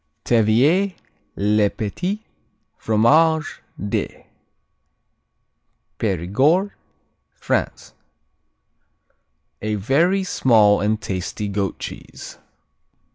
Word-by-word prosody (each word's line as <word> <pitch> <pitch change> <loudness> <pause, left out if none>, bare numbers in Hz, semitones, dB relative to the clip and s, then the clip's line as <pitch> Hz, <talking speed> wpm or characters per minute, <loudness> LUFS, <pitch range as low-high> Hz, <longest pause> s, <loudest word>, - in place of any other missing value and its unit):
Taiviers, 130 - +3 0.4
les 105 +1 +2
Petits 180 - -4 0.5
Fromages 155 +9 +2 0.2
de 100 - -4 1.8
Périgord, 125 - +1 0.6
France - - -3 1.7
Very 135 - +1
small 110 - +3
and 105 +1 0
tasty 95 +1 -4
goat 100 -1 -2
cheese. - - -9
110 Hz, 60 wpm, -21 LUFS, 105-160 Hz, 1.8 s, Taiviers